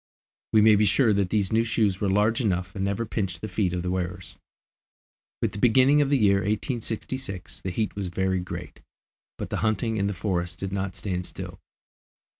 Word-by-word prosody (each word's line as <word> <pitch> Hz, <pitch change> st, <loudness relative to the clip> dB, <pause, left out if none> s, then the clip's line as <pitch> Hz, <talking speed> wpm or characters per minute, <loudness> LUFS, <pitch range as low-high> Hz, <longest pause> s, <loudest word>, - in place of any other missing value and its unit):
We 110 Hz, -, +5 dB
may 110 Hz, 0 st, +7 dB
be 105 Hz, +1 st, +4 dB
sure 110 Hz, +2 st, +4 dB
that 100 Hz, -2 st, +1 dB
these 105 Hz, -1 st, 0 dB
new 115 Hz, +1 st, +4 dB
shoes 105 Hz, -4 st, +1 dB
were 100 Hz, -, +1 dB
large 105 Hz, +5 st, +2 dB
enough 90 Hz, -4 st, -1 dB
and 95 Hz, -, -2 dB
never 100 Hz, +4 st, -1 dB
pinched 95 Hz, -6 st, -3 dB
the 110 Hz, -, -3 dB
feet 100 Hz, -5 st, 0 dB
of 90 Hz, -1 st, -2 dB
the 90 Hz, -, -1 dB
wearers. 90 Hz, -1 st, -4 dB, 1.1 s
With -, -, +1 dB
the 100 Hz, -, -7 dB
beginning 130 Hz, +6 st, +5 dB
of 140 Hz, -, +1 dB
the 140 Hz, -, +4 dB
year 100 Hz, -4 st, +4 dB
1866 110 Hz, 0 st, -3 dB
the 95 Hz, -, -3 dB
heat 105 Hz, +3 st, -2 dB
was 100 Hz, -2 st, -3 dB
very 95 Hz, +1 st, 0 dB
great, 90 Hz, -, -7 dB, 0.6 s
but -, -, -6 dB
the -, -, -1 dB
hunting 110 Hz, +1 st, 0 dB
in 100 Hz, -1 st, +1 dB
the 100 Hz, -, -2 dB
forests 85 Hz, -2 st, -1 dB
did 95 Hz, 0 st, -4 dB
not 95 Hz, -1 st, -2 dB
stand 90 Hz, -3 st, -3 dB
still. -, -, -8 dB
100 Hz, 200 wpm, -26 LUFS, 95-110 Hz, 1.1 s, may